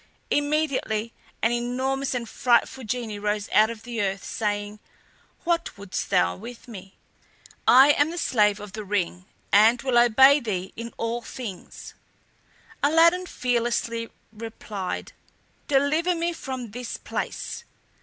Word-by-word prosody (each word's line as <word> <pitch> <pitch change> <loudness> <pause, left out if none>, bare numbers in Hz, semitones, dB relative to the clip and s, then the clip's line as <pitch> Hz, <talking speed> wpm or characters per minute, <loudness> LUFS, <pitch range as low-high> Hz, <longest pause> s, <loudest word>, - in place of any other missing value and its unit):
Immediately 290 -7 0 0.3
an 225 - +4
enormous 260 +3 -1
and 235 -2 -3
frightful 245 +3 +1
genie 225 -2 -3
rose 210 0 -1
out 215 +1 +5
of 225 -2 -8
the 235 -3 -3
earth, 195 -1 -2
saying: 205 -1 -3 0.6
"What 340 -7 -1
wouldst 200 -1 -5
thou 90 0 +2
with 245 - -10
me? 195 -4 -11 0.7
I 265 +3 +8
am 290 +1 +2
the 340 - -6
Slave 210 -9 +2
of 205 -2 -9
the 215 0 -5
Ring, 185 -3 -2 0.3
and 220 +4 +6
will 255 -3 +3
obey 265 +5 +6
thee 190 -7 -4
in 230 +1 -6
all 230 +1 -2
things." 225 -7 -8 0.9
Aladdin 335 +5 +4
fearlessly 235 -3 -1 0.2
replied, 215 -4 -6 0.5
"Deliver 300 +6 +2
me 340 +1 -1
from 260 -7 -6
this 245 +1 -5
place!" - - -5
235 Hz, 130 wpm, -25 LUFS, 210-270 Hz, 0.9 s, I